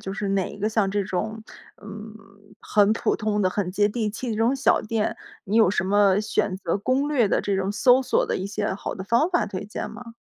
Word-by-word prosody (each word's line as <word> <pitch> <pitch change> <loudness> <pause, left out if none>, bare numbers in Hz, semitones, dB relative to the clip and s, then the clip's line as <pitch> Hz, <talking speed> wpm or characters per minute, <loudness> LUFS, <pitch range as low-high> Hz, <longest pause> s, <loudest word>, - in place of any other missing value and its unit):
就 195 - -6
是 205 -1 -3
哪 195 -1 -1
个 210 +2 -1
像 215 -3 +1
这 200 +1 0
种， 215 +4 -4 0.4
嗯， 210 +1 -9 0.5
很 210 0 +3
普 - - 0
通 210 -1 -1
的、 185 - +2
很 195 -1 -2
接 205 +2 +2
地 215 0 -2
气 235 +3 -5
的 215 - -2
这 - - -5
种 235 +4 +3
小 270 0 +2
店， 215 0 -2 0.3
你 205 +3 -1
有 220 -5 +6
什 190 - 0
么 200 0 +3
选 205 -2 -1
择 190 0 -2
攻 260 +7 0
略 260 -7 +2
的 - - +1
这 200 -1 -1
种 190 +1 -1
搜 250 +4 +4
索 260 - +1
的 - - -2
一 190 - -4
些 205 0 -2
好 190 - -5
的 190 - -6
方 235 - +2
法 350 - +1
推 190 -2 -5
荐 210 +1 -6
吗？ 230 +1 -11
210 Hz, 255 characters per minute, -24 LUFS, 195-225 Hz, 0.5 s, 有